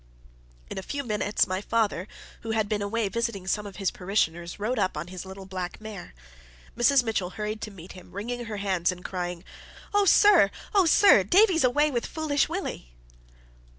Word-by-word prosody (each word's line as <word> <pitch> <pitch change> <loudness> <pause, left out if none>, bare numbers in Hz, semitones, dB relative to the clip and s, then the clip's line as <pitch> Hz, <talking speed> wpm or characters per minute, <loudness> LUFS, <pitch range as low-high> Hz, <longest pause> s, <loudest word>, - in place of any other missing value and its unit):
In - - -4
a - - -5
few 280 +9 -4
minutes, 210 -3 +1
my 185 0 -3
father, 210 -4 0 0.3
who 225 - -7
had 220 -2 +1
been 205 0 -1
away 210 +1 -1
visiting 230 -3 -3
some 205 +2 -1
of 200 - -10
his 195 -3 -1
parishioners, 175 -3 -1
rode 225 +4 -1
up 190 -5 0
on 170 +3 -5
his 185 0 -8
little 190 0 -9
black 185 -2 -5
mare. 215 - -9 0.6
Mrs. 245 +3 +4
Mitchell 215 -6 -1
hurried 210 +3 -5
to - - -5
meet 185 -3 -12
him, 185 -1 -13
wringing 240 +5 -5
her 215 -2 -5
hands, 190 -4 0
and 180 0 -10
crying 175 -2 -4 0.5
"Oh, 410 0 +4
sir! 395 - +6 0.2
oh, 390 -4 +4
sir! 325 - +6
Davie's 365 - +4
away 290 +4 +3
with 240 -3 -2
Foolish 305 -3 0
Willie!" 340 - -5
210 Hz, 185 wpm, -26 LUFS, 185-245 Hz, 0.6 s, sir